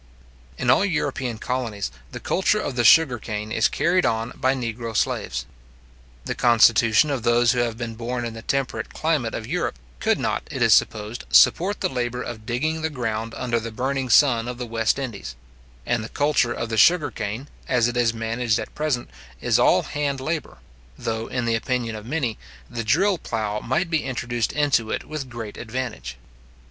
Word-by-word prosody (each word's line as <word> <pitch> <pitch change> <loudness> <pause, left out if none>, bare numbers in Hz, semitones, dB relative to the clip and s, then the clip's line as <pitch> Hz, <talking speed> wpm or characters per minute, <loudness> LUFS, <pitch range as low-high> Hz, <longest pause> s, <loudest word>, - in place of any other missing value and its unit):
In 120 - +2
all 135 - +4
European 140 - -1
colonies, 115 -4 -3 0.2
the - - -6
culture 190 +3 +1
of 145 -10 -3
the 120 - +1
sugar 130 -1 +6
cane 105 0 -5
is 110 - +3
carried 180 +1 +1
on 115 +2 0
by 130 0 +1
negro 115 -2 -4
slaves. - - -1 0.8
The - - -2
constitution 115 +3 +4
of 135 -3 -1
those 120 +1 +4
who 125 - 0
have 115 -2 -1
been 115 -2 -4
born 120 +2 -3
in 115 - -4
the 115 - -8
temperate 120 -3 -2
climate 155 -8 0
of 110 - -5
Europe 165 - -2 0.2
could - - +2
not, - - -1
it - - -1
is - - +6
supposed, 110 +2 +1
support 195 +5 +4
the - - +2
labour 125 -1 -3
of 110 -2 -8
digging 155 +7 -1
the 160 - 0
ground 115 -5 -3
under 120 -2 0
the 115 0 -6
burning 130 +3 -2
sun 120 -2 +5
of 125 0 -5
the 125 - -4
West 115 0 0
Indies; 115 - -5 0.5
and 120 -2 0
the 110 - -7
culture 145 -4 +1
of 115 -1 -3
the 110 - -2
sugar 155 - +5
cane, 110 +6 -5 0.2
as 120 -2 +3
it 120 - -3
is 120 -2 +3
managed 115 0 -1
at - - -6
present, 150 -5 -1 0.3
is - - +2
all - - +4
hand 145 -2 -2
labour; 155 +3 -3 0.4
though, 110 0 -3
in 125 -2 -2
the 115 - +1
opinion 115 0 -1
of 110 +1 -8
many, 130 -6 -2 0.3
the 120 -1 -4
drill 175 - +2
plough 105 -4 -2
might 160 - -1
be 160 - +1
introduced 120 -3 -2
into 140 -7 +2
it - - -2
with 150 -4 -6
great 115 -4 -7
advantage. 110 - -5
120 Hz, 190 wpm, -23 LUFS, 115-135 Hz, 0.8 s, sugar